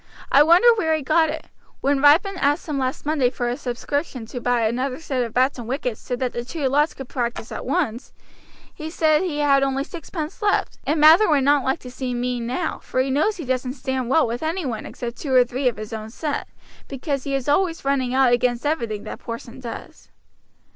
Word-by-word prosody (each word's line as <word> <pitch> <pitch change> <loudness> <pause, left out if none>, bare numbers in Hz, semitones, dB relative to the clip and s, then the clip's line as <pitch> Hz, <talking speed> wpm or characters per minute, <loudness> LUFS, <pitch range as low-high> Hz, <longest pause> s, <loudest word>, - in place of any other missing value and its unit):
"I 280 - +7
wonder 340 +9 +6
where 320 -4 +2
he 310 - -3
got 315 +3 +3
it. 315 +1 -5 0.4
When 275 0 +1
Ripon 330 +7 +5
asked 290 +1 +1
him 295 -3 -2
last 260 +1 -2
Monday 290 -5 +2
for 245 -1 -3
a 240 - -1
subscription 255 +1 -3
to 245 +2 -7
buy 245 -1 +1
another 255 +4 -1
set 270 -5 -2
of 230 - -5
bats 255 +3 +1
and 235 - -7
wickets, 250 -3 -3
so 250 - -3
that 250 0 -2
two 295 -1 -2
lots 295 +4 +2
could 270 - -8
practise 235 -3 -3
at - - -6
once, 265 -6 -1 0.6
he 310 +1 -7
said 315 -1 +2
he 350 -6 -2
had 280 -2 +3
only 270 0 0
sixpence 320 +2 -7
left, 415 -1 0
and 305 +2 +1
Mather 320 +7 +7
would 290 -3 +3
not 285 0 +3
like 265 +4 0
to 250 - -9
seem 250 -1 -3
mean 245 -1 -2
now, 315 +7 -2
for - - -3
he 265 +1 +1
knows 310 +10 +1
he 325 - -6
doesn't 255 0 -1
stand 260 -2 -3
well 320 +4 +4
with 235 +1 -3
any 325 +2 -2
one 230 -5 -4
except 240 -1 -6
two 270 -4 -1
or 250 - +7
three 250 +2 -2
of 240 - 0
his 215 +1 -7
own 220 0 -5
set, 290 +5 -3 0.4
because 275 0 -3
he 275 -1 -2
is 270 -1 -3
always 330 +1 +1
running 270 -3 +1
out 260 -2 +4
against 245 +1 +1
everything 235 -9 -1
that - - -7
Porson 235 +1 -8
does." 235 -3 -9
270 Hz, 220 wpm, -22 LUFS, 245-305 Hz, 0.6 s, I